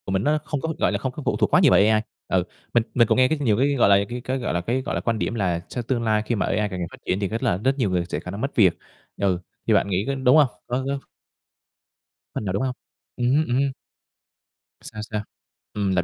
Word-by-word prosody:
Của - - -3
mình 95 +1 +1
nó 150 +3 +2
không 145 -3 -3
có, 160 0 -2
gọi - - +2
là, - - 0
không 130 - -2
có 150 +2 -8
phụ - - +1
thuộc - - +1
quá - - +7
nhiều - - +5
vào - - +6
AI. 110 +1 +4 0.3
Ừ, 95 -1 +2 0.3
mình 120 - +4
mình 120 -2 +4
cũng - - +2
nghe 130 0 +5
nhiều 115 -8 +2
cái, 140 +3 +2
gọi 120 - +4
là, 100 0 +5
cái 120 +1 -5
cái, 130 +1 -1
gọi 125 - -2
là, 85 - 0
cái, 120 +8 -1
gọi - - -3
là, - - -1
quan 115 -2 -1
điểm - - -1
là 90 -6 0
trong 120 - -4
tương 120 0 -1
lai 110 -1 +2
khi 120 - 0
mà 100 - 0
AI 105 0 0
càng 95 -2 -5
ngày 85 - -2
phát - - -12
triển 95 - 0
thì 100 - 0
rất 115 +4 -4
là 85 - +2
rất 135 +7 0
nhiều 120 -7 +1
người 90 -2 0
sẽ 75 - -2
khả 90 +2 -7
năng 100 +3 -6
mất 135 - -3
việc, 95 -7 +4 0.4
ừ, 95 -3 +1 0.3
thì - - +4
bạn - - +3
nghĩ 95 0 +1
có 140 - 0
đúng 130 +1 +4
hông? 150 -3 +6 0.2
Có 125 +2 -1
có 140 0 -1 1.4
Phần - - -3
nào, 95 - -1
đúng 100 - 0
không? 130 -1 -2 0.4
Ừm 120 - 0
hứm, 155 +1 +3
ừm 120 - 0
hưm. 140 0 +1 1.1
Sao? 110 -1 -8
Sao? 105 -1 -1 0.5
Ừm, 100 -2 0
lặp 90 - +2
115 Hz, 285 wpm, -23 LUFS, 100-130 Hz, 1.4 s, quá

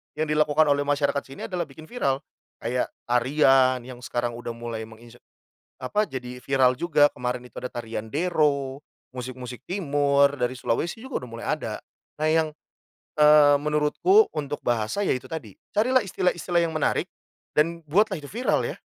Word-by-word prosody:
yang 155 0 -2
dilakukan 150 0 +3
oleh 145 0 +2
masyarakat 145 0 +1
sini 135 +1 -8
adalah 175 -3 -2
bikin 150 +2 -13
viral. 140 - -1 0.4
Kayak 125 +2 0 0.2
tarian 130 +1 +4
yang 125 0 -10
sekarang 120 0 -2
udah 120 0 -5
mulai 115 -1 -5
menginse 115 +2 -15 0.6
apa, 210 +12 0
jadi 125 -5 -7
viral 130 0 +2
juga 145 -3 +4
kemarin 125 0 -3
itu 125 - -14
ada - - -5
tarian 115 -2 -5
Dero, 145 -1 0 0.3
musik-musik 125 0 -7
timur, 145 -6 +2
dari 125 0 0
Sulawesi 145 - -2
juga 260 - -5
udah - - -12
mulai 115 - -7
ada. - - -2 0.4
Nah 155 - +2
yang, 160 -1 +2 0.7
eee, 150 -1 +7
menurutku 150 - +3
untuk 145 -1 -4
bahasa 120 - 0
ya 200 - +1
itu 130 0 -1
tadi. 130 -9 -7 0.2
Carilah 250 +5 +4
istilah-istilah 175 -1 0
yang 165 - 0
menarik 155 - 0 0.5
dan 165 +2 +2
buatlah 190 -1 +2
itu 145 - -10
viral 240 +5 +1
ya. - - -4
140 Hz, 160 wpm, -25 LUFS, 125-155 Hz, 0.7 s, eee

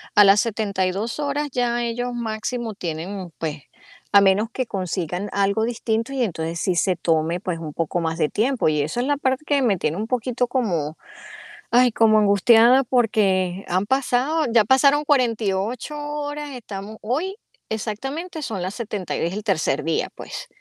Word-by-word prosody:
a 205 - +9
las 195 +1 +6
72 205 +1 -1
horas 290 0 -1
ya 240 -1 0
ellos 245 +1 -2
máximo 225 0 -3
tienen, 175 +2 -5
pues 155 -3 -4 0.5
a 200 - +8
menos 200 +3 +3
que 255 - -2
consigan 185 0 -3
algo 200 +2 +1
distinto 230 +1 -1
y 265 - -1
entonces 165 -5 -3
sí 185 0 0
se 185 +1 +2
tome 165 0 0
pues 180 -1 -3
un 155 -2 -7
poco 165 +2 -1
más 165 0 -2
de 155 - +3
tiempo. 245 -2 +1
Y 150 -1 +1
eso 155 +11 -2
es 250 - 0
la 290 -1 +1
parte 265 +1 -1
que 285 -2 +2
me 210 -6 +2
tiene 160 -2 -1
un 215 - -2
poquito 250 0 -1
como, 175 - -1 0.7
ay, 245 +1 +5
como 220 -1 +4
angustiada 225 +5 +5
porque 200 -6 +1
han 185 +3 0
pasado 270 +5 +1
ya 225 -3 +5
pasaron 280 +4 +4
48 230 0 0
horas, 295 0 -4
estamos 210 -2 -8
hoy, 310 - -2 0.3
exactamente 270 - -4
son 220 -9 -4
las 185 +3 -4
70 210 -6 -4
es 170 +2 -1
el 210 +2 -4
tercer 160 -9 0
día, 165 +1 0
pues, - - -8
220 Hz, 170 wpm, -22 LUFS, 185-250 Hz, 0.7 s, a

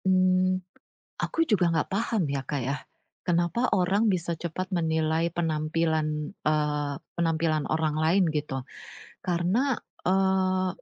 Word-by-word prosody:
Mmm. 185 0 +3 0.6
Aku 330 - +1
juga 200 - +3
ga 165 -2 +1
paham 210 -1 0
ya, 140 - -1
Kak 145 -2 -1
ya. 135 +3 -1 0.5
Kenapa 175 +8 +1
orang 195 +4 +2
bisa 175 -3 0
cepat 185 +3 -4
menilai 160 -1 +1
penampilan, 155 -2 -1
eee, 150 -4 0 0.2
penampilan 165 -2 +1
orang 155 -1 0
lain 175 +5 +4
gitu. 145 -4 -3 0.6
Karena, 185 +9 +1 0.2
eee 190 0 +2
170 Hz, 115 wpm, -27 LUFS, 155-185 Hz, 0.6 s, lain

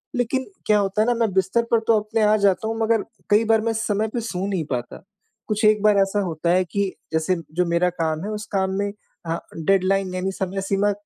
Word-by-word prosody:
लेकिन 245 +2 0 0.2
क्या 210 -1 +4
होता 200 +2 0
है 220 - +2
ना 245 - +3
मैं 225 -4 +2
बिस्तर 190 +5 +2
पर 230 - +5
तो 225 -2 +5
अपने 215 +1 -2
आ 210 +1 +5
जाता 195 +3 +2
हूँ 225 0 -3
मगर 225 -1 +2 0.3
कई 210 +2 +5
बार 225 0 +3
मैं 225 +1 0
समय 215 -1 0
पे 240 - -1
सो 195 -4 -3
नहीं 185 -6 -2
पाता। 120 +5 -4 0.4
कुछ 215 +1 -1
एक 215 -1 +4
बार 210 -1 +5
ऐसा 195 +1 +2
होता 170 -2 -2
है 185 +1 +3
कि, 195 +2 -2 0.2
जैसे 160 +3 +1 0.2
जो 180 +1 +1
मेरा 170 +1 +2
काम 160 +1 -1
है 215 - -3
उस 210 0 -5
काम 190 0 +1
में 200 0 -1 0.3
अ, 165 0 -1 0.2
डेडलाइन 190 +2 +1
यानी 190 +1 -1
समय 190 0 -3
सीमा, 195 +1 +1
200 Hz, 230 wpm, -22 LUFS, 185-215 Hz, 0.4 s, पर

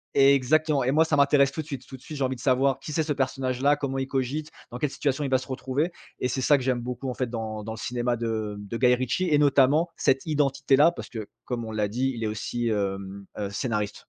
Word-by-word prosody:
exactement 140 +2 +4
et 130 - +1
moi 160 +3 +5
ça 155 - +1
m'intéresse 140 -1 +4
tout 155 - -4
de - - -11
suite. 135 -4 -6
Tout 130 - -9
de - - -23
suite, 150 - -8
j'ai 140 - -1
envie 130 0 0
de 120 - -12
savoir 135 0 +2
qui 150 - -7
c'est 160 - +1
ce 150 -1 -1
personnage-là? 135 +1 +1
Comment 135 -2 -3
il 135 - -2
cogite? 135 +4 -2 0.2
Dans 120 - -5
quelle 150 - 0
situation 140 0 -1
il 135 - -1
va 130 - +5
se 130 - -10
retrouver? 135 +6 -2 0.3
Et 125 - 0
c'est 130 +1 -2
ça 145 +3 +5
que 130 - -5
j'aime 125 -2 +1
beaucoup, 125 +2 -4
en - - -2
fait, 130 - -1
dans 110 -2 -4
dans 110 +1 -5
le - - -8
cinéma 120 0 -1
de, 110 -2 -2
hem, 100 0 -9
de 115 - -4
Guy 125 0 +4
Ritchie 130 +9 -1
et 150 - +4
notamment, 145 +4 +4
cette 135 +3 +2
identité-là, 140 0 +3
parce - - -9
que, 110 -3 -6 0.2
comme 120 -2 -3
on 110 - -6
l'a 105 -1 0
dit 130 +5 -1
il 115 - -4
est - - 0
aussi, 120 +2 -3
hem, 100 -1 -3
heu, 100 -1 -2
scénariste. 105 -3 -2
130 Hz, 265 wpm, -26 LUFS, 120-140 Hz, 0.3 s, moi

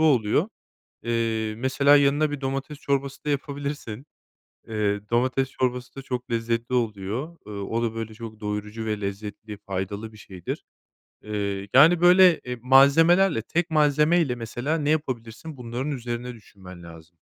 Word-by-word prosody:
oluyor. 145 - +3 0.5
Eee, 115 -2 -1
mesela 140 +3 +4
yanına 145 +2 +3
bir 145 -1 -5
domates 135 +2 -4
çorbası 140 0 -2
da 150 - -1
yapabilirsin. 140 -3 -4 0.6
Eee, 105 -2 0
domates 130 +2 +1
çorbası 125 0 -2
da 135 - -6
çok 125 -2 -5
lezzetli 115 +1 -1
oluyor, 115 - -2
ııı, 100 -1 -5
o 115 +3 -1
da, 115 -1 -1
böyle, 110 -1 -5
çok 110 -1 -9
doyurucu 105 +1 -4
ve 105 -1 -2
lezzetli, 105 +1 -6
faydalı 100 +2 -5
bir 110 - -15
şeydir. 90 -4 -7 0.6
Eee, 100 -2 -3
yani, 165 +6 +7
böyle, 180 -1 +7
eee, 125 -1 -6
malzemelerle, 140 +5 +5
tek 170 +8 -1
malzeme 150 +2 +3
ile 130 -6 0
mesela 120 +7 -3
ne 150 -2 -1
yapabilirsin 135 -1 -3
bunların 125 +4 -4
üzerine 125 -1 -4
düşünmen 95 -5 -14
lazım. 85 0 -14
120 Hz, 145 wpm, -25 LUFS, 110-140 Hz, 0.6 s, yani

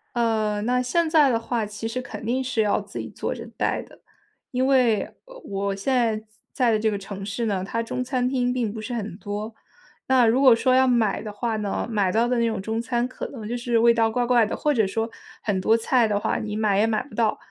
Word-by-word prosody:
呃， 220 -3 +1
那 250 +2 +1
现 330 +7 +1
在 305 -4 +5
的 230 -3 +1
话， 230 -1 -2
其 210 +2 -6
实 255 +3 -3
肯 245 - -8
定 255 +3 0
是 245 -3 0
要 210 0 +1
自 205 +1 -10
己 - - -5
做 - - -4
着 - - -8
带 - - 0
的。 - - -18 0.5
因 255 +1 +1
为， 250 -6 +3 0.2
呃， - - -13
我 200 0 -2
现 230 +7 -1
在 225 -3 +1 0.3
在 250 -4 +2
的 215 - +2
这 220 +1 +2
个 205 - -2
城 195 0 -7
市 210 +4 -3
呢， 195 -4 -1
它 230 +4 -2
中 250 +2 -3
餐 255 -1 0
厅 250 -1 0
并 240 -4 -1
不 220 - -6
是 240 +3 -5
很 210 -5 -4
多。 210 +1 -5 0.5
那 260 -2 +5
如 235 +4 +3
果 260 -4 +7
说 255 +2 +2
要 260 0 +5
买 230 -5 +2
的 215 - -6
话 225 +2 -2
呢， 210 +1 -2
买 205 -5 +1
到 230 +4 +2
的 245 -1 +1
那 235 - +2
种 220 -3 -2
中 220 +3 -2
餐 240 0 -1
可 255 - -6
能 225 -6 -8
就 240 - -3
是 240 -1 0
味 235 +1 +5
道 225 -1 +2
怪 245 +2 0
怪 240 -2 +4
的， - - -4
或 300 - +1
者 220 -7 +2
说， 225 +3 -2 0.3
很 195 -3 0
多 220 +4 +4
菜 235 0 +2
的 205 -1 0
话， - - -1
你 210 -1 -4
买 210 -2 +2
也 220 - +3
买 220 -1 0
不 285 - -17
到。 220 -1 +1
230 Hz, 270 characters per minute, -24 LUFS, 210-250 Hz, 0.5 s, 果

